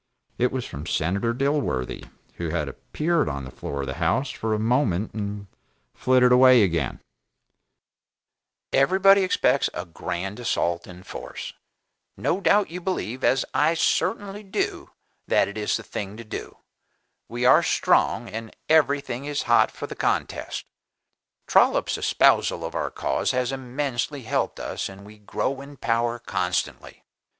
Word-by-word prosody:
It 125 +1 +2
was 130 -2 -3
from 75 +3 -7
Senator 95 +10 0
Dilworthy, 135 - -1 0.3
who 85 -2 -3
had 80 -2 -1
appeared 155 - -1
upon 70 -2 -3
the 65 - -9
floor 70 +2 -5
of - - -3
the 65 - -4
House 130 - +1
for 110 -1 -2
a - - -2
moment 110 -4 +1
and 105 -1 -4 0.5
flitted 125 -1 +3
away 125 -2 +7
again: 85 -8 -1 1.7
"Everybody 190 +8 +5
expects 185 - +2
a 90 - -4
grand 90 +4 -5
assault 85 -7 -1
in 90 0 -11
force; - - -7 0.6
no 190 - 0
doubt 205 -2 +3
you 180 +1 -5
believe, 130 - -3
as 130 - +3
I 155 +4 +3
certainly 205 +4 0
do, 195 -2 -3 0.4
that - - +3
it 100 - -8
is 105 -1 0
the - - -9
thing 100 +1 -6
to 115 - -8
do; 110 - -7 0.7
we 120 +2 -2
are 130 - +7
strong, - - +2
and 110 +2 -7
everything 140 -4 +2
is 145 0 -2
hot 120 0 +4
for - - -7
the - - -7
contest. - - -2 0.8
Trollop's - - +3
espousal - - +3
of - - -5
our - - -1
cause - - -1
has 125 0 0
immensely 135 +1 -3
helped 110 - -1
us - - -4
and 100 +1 -12
we 105 +1 -14
grow 130 +6 -2
in 140 0 -11
power 120 0 0
constantly. 90 -7 -3
120 Hz, 150 wpm, -25 LUFS, 95-140 Hz, 1.7 s, away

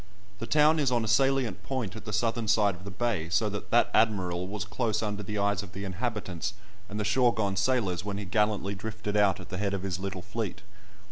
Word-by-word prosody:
The 115 - -4
town 155 +1 +5
is 140 -4 +2
on 120 -2 +2
a - - -4
salient 125 -3 +2
point 120 -7 -3
at 110 - -9
the 105 - -4
southern 115 +2 0
side 105 -2 +4
of 90 +2 -12
the - - -5
bay, 100 -5 -1
so 105 +4 +2
that 100 0 -6
"that 120 - +4
Admiral" 90 -5 +2
was 105 +1 -4
close 110 0 -1
under 105 -1 -2
the 105 +1 -4
eyes 100 -1 +1
of 100 -4 -11
the 100 - -5
inhabitants 100 -2 -3 0.3
and 105 +1 -4
the - - 0
shore 120 +3 +3
gone 100 -3 0
sailors 100 -4 +1
when 100 -1 -3
he 100 - -4
gallantly 100 +1 +1
drifted 105 +1 -4
out 100 -3 +4
at 90 - -10
the 90 -1 -4
head 100 -1 0
of 95 - -4
his 95 -2 -2
little 95 -2 -4
fleet. 105 0 -4
105 Hz, 230 wpm, -29 LUFS, 95-115 Hz, 0.3 s, town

